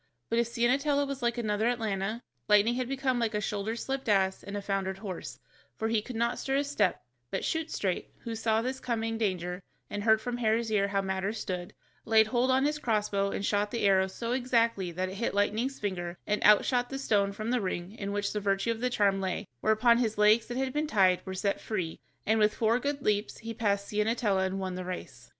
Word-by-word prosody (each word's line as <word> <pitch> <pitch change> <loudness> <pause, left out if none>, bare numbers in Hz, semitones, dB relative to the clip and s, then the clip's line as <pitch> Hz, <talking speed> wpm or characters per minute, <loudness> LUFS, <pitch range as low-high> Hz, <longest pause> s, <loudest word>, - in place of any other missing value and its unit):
But 230 - +3
if 235 - +2
Ciennetella 275 +5 +2
was 275 -1 -5
like 235 0 0
another 215 -1 0
Atalanta, 220 -2 -1 0.2
Lightning 210 +2 +5
had 250 0 -2
become 265 -2 0
like 230 -2 0
a - - +1
shoulder 210 +2 -2
slipped 265 +1 -3
ass 190 -2 +2
and 200 +1 -6
a - - -3
foundered 195 -1 -2
horse, 195 -4 -6 0.4
for 220 - -1
he 225 -1 +2
could 245 +3 -8
not 235 +2 0
stir 270 - -1
a 280 - +2
step, 290 - 0 0.3
but - - -2
Shoot 320 0 -1
straight, 185 -3 -2
who 230 - -5
saw 225 0 +1
his 260 +2 -3
coming 225 -2 -2
danger, 180 -3 -1 0.3
and 205 0 -3
heard 220 0 +5
from 245 +1 -4
Hare's 225 -1 +1
ear 200 -2 +2
how 200 -1 0
matters 190 +3 -2
stood, 180 -3 -5 0.3
laid 220 -1 +5
hold 240 +3 +1
on 260 +1 +3
his 300 +1 0
crossbow 210 -5 0
and 200 - -3
shot 205 0 +1
the 230 -1 -1
arrow 190 -1 +4
so 230 +5 -5
exactly 230 -7 +1
that 185 +2 -2
it 190 - -7
hit 230 -2 -1
Lightning's 220 +6 0
finger, 175 -4 -3
and 210 0 0
out 210 0 +7
shot 245 -1 +1
the 270 - -4
stone 205 -7 +1
from 215 +3 -4
the 250 -2 +1
ring 185 -1 -3
in 200 -2 -5
which 205 0 -1
the 210 - -1
virtue 195 +2 0
of 225 0 -4
the 250 - +1
charm 200 -5 +2
lay, 190 +2 -2
whereupon 235 - +4
his 220 -3 0
legs 215 +2 +5
that 245 - -4
had 265 -1 -1
been 300 +1 0
tied 190 -8 +3
were 190 - -4
set 200 +1 -1
free, 185 -7 -3 0.3
and 220 +1 +2
with 210 0 +3
four 230 +2 +2
good 285 +1 -2
leaps 210 0 0
he 230 0 -6
passed 200 -3 0
Ciennetella 210 -2 +1
and 190 +1 -3
won 190 -1 -3
the 185 0 -4
race. 135 -9 -7
215 Hz, 225 wpm, -29 LUFS, 195-240 Hz, 0.4 s, out